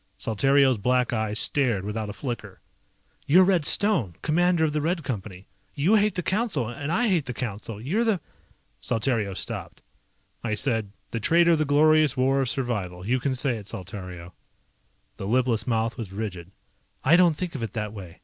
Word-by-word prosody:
Saltario's 135 Hz, +2 st, +3 dB
black 125 Hz, +3 st, +1 dB
eyes 110 Hz, -2 st, -1 dB
stared 120 Hz, -8 st, 0 dB
without 105 Hz, 0 st, -3 dB
a -, -, -5 dB
flicker. 120 Hz, +1 st, -6 dB, 0.7 s
"You're 180 Hz, +6 st, +7 dB
Red 180 Hz, -5 st, +2 dB
Stone, 170 Hz, -, +1 dB
Commander 175 Hz, +1 st, +2 dB
of 150 Hz, -, -1 dB
the 150 Hz, -, 0 dB
Red 165 Hz, +2 st, -1 dB
Company. 100 Hz, -7 st, -6 dB, 0.3 s
You 155 Hz, +8 st, +2 dB
hate 210 Hz, -1 st, +3 dB
the 180 Hz, -, -2 dB
Council 190 Hz, -, 0 dB
and 140 Hz, +6 st, -5 dB
I 235 Hz, +8 st, +2 dB
hate 175 Hz, -8 st, +1 dB
the 125 Hz, -, -4 dB
Council. 110 Hz, -3 st, -5 dB
You're 170 Hz, -, 0 dB
the 220 Hz, -5 st, +1 dB, 0.4 s
..." -, -, -42 dB
Saltario 110 Hz, -4 st, 0 dB
stopped. -, -, -5 dB, 0.6 s
I 110 Hz, -2 st, -1 dB
said, 110 Hz, -3 st, -1 dB, 0.2 s
"The 115 Hz, -, -2 dB
Traitor 170 Hz, +8 st, +4 dB
of 165 Hz, -, +3 dB
the 155 Hz, -, +2 dB
Glorious 155 Hz, 0 st, +4 dB
War 135 Hz, +2 st, +2 dB
of 130 Hz, -, 0 dB
Survival. 100 Hz, -9 st, -3 dB
You 125 Hz, +4 st, +1 dB
can 130 Hz, +1 st, -1 dB
say 130 Hz, -2 st, 0 dB
it, 100 Hz, -2 st, -10 dB
Saltario." 90 Hz, -3 st, -8 dB, 0.8 s
The 95 Hz, -, -5 dB
lipless 120 Hz, -1 st, +1 dB
mouth 115 Hz, -1 st, 0 dB
was 105 Hz, -5 st, -5 dB
rigid. 95 Hz, -4 st, -5 dB, 0.5 s
"I 150 Hz, +6 st, +5 dB
don't 175 Hz, -3 st, +5 dB
think 180 Hz, +2 st, -4 dB
of 135 Hz, -, -5 dB
it 115 Hz, -, -4 dB
that 105 Hz, -2 st, -4 dB
way. 95 Hz, -5 st, -10 dB
125 Hz, 185 wpm, -25 LUFS, 105-155 Hz, 0.8 s, You're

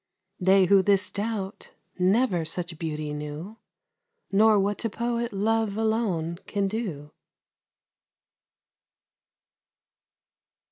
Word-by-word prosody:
They 190 Hz, +1 st, +5 dB
who 195 Hz, +1 st, +5 dB
this 200 Hz, 0 st, +2 dB
doubt 205 Hz, -2 st, -4 dB, 0.3 s
never 185 Hz, -1 st, +2 dB
such 170 Hz, 0 st, -5 dB
beauty 155 Hz, -2 st, -3 dB
knew, 150 Hz, +8 st, -6 dB, 0.7 s
Nor 210 Hz, +1 st, +5 dB
what 200 Hz, +1 st, 0 dB
to 230 Hz, -, -1 dB
poet 235 Hz, +1 st, -2 dB
love 215 Hz, +1 st, 0 dB
alone 205 Hz, -7 st, 0 dB
can 200 Hz, -1 st, 0 dB
do. 185 Hz, -9 st, -4 dB
195 Hz, 90 wpm, -26 LUFS, 170-220 Hz, 0.7 s, They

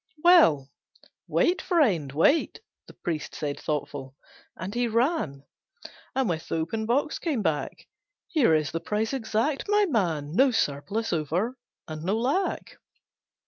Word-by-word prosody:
'" 300 Hz, -, -24 dB
"Well, 160 Hz, -, +5 dB, 0.6 s
wait, 360 Hz, +2 st, +2 dB
friend, 215 Hz, -, +2 dB
wait!" 165 Hz, -, +2 dB, 0.3 s
The -, -, -13 dB
priest 165 Hz, -4 st, -4 dB
said 145 Hz, -2 st, -3 dB
thoughtful, 140 Hz, -3 st, -4 dB, 0.4 s
and 185 Hz, +3 st, -5 dB
he 240 Hz, 0 st, +1 dB
ran 230 Hz, -, 0 dB, 0.7 s
And 265 Hz, -2 st, +1 dB
with 165 Hz, -3 st, -3 dB
the -, -, -2 dB
open 215 Hz, +8 st, -2 dB
box 280 Hz, +6 st, 0 dB
came 285 Hz, -11 st, -1 dB
back, 155 Hz, -4 st, -2 dB, 0.4 s
"Here 255 Hz, -, +3 dB
is 155 Hz, -3 st, 0 dB
the 165 Hz, -, -2 dB
price 215 Hz, +7 st, -2 dB
exact, 265 Hz, +3 st, -1 dB
my 415 Hz, 0 st, +4 dB
man, 170 Hz, -, -1 dB
No 265 Hz, +4 st, +5 dB
surplus 210 Hz, -, -1 dB
over, 175 Hz, -, -1 dB, 0.3 s
and 155 Hz, -1 st, -7 dB
no 195 Hz, +5 st, 0 dB
lack. 280 Hz, +12 st, -1 dB
215 Hz, 145 wpm, -26 LUFS, -, 0.7 s, Well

